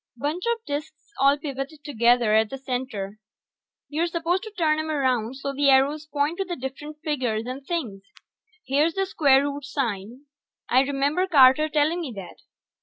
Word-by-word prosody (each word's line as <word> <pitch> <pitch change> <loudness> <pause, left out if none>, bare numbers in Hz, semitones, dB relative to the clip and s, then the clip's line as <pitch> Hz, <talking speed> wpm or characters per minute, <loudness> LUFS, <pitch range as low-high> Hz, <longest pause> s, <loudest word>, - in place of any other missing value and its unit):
Bunch 300 +8 -3
of 465 -1 -1
disks 290 +6 -6
all 275 +2 +5
pivoted 285 +1 -6
together 235 -4 +3
at 220 0 +3
the 270 - -6
center; 245 -6 -4 0.7
you're 320 +4 -1
supposed 340 +2 -1
to 435 - -8
turn 310 -3 +2
'em 315 0 -3
around 255 -5 0
so 275 +1 -4
the 280 0 +2
arrows 285 +3 +3
point 295 +3 -1
to - - +2
the 355 -2 -5
different 275 +3 -7
figures 250 -8 -1
and 255 +2 -6
things. 260 - -4 0.6
Here's 295 +5 +1
the 390 0 +1
square 280 -7 +4
root 285 0 -4
sign, 245 -2 -4 0.4
I 255 - +4
remember 285 +6 0
Carter 290 -1 +6
telling 310 +3 +1
me 295 -7 -5
that. 195 -2 -9
280 Hz, 170 wpm, -24 LUFS, 255-310 Hz, 0.7 s, Carter